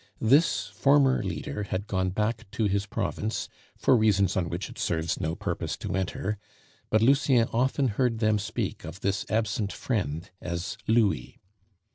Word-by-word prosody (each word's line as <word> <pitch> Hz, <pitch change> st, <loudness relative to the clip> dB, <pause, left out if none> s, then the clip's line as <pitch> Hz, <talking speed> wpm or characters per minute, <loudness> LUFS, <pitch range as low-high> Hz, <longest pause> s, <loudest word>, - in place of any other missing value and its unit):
This 115 Hz, -, +4 dB
former 135 Hz, +5 st, +4 dB
leader 85 Hz, -2 st, -4 dB
had 100 Hz, 0 st, -3 dB
gone 95 Hz, -3 st, 0 dB
back 105 Hz, +2 st, -2 dB
to 115 Hz, -, 0 dB
his 100 Hz, 0 st, +1 dB
province 110 Hz, +1 st, -2 dB, 0.3 s
for 130 Hz, -, +4 dB
reasons 100 Hz, -4 st, +3 dB
on 85 Hz, -3 st, 0 dB
which -, -, -3 dB
it -, -, -11 dB
serves 80 Hz, 0 st, -1 dB
no 80 Hz, +1 st, -1 dB
purpose -, -, -3 dB
to -, -, -4 dB
enter, 95 Hz, +2 st, -2 dB, 0.5 s
but 110 Hz, 0 st, +3 dB
Lucien 130 Hz, -2 st, +4 dB
often 130 Hz, +3 st, +2 dB
heard 115 Hz, +1 st, +1 dB
them 110 Hz, -2 st, +2 dB
speak 110 Hz, +2 st, -3 dB
of 95 Hz, -, -8 dB
this 100 Hz, +1 st, -1 dB
absent 110 Hz, -2 st, 0 dB
friend 90 Hz, -, -3 dB
as 85 Hz, +4 st, -3 dB
"Louis." 105 Hz, -, +1 dB
105 Hz, 155 wpm, -27 LUFS, 95-115 Hz, 0.5 s, This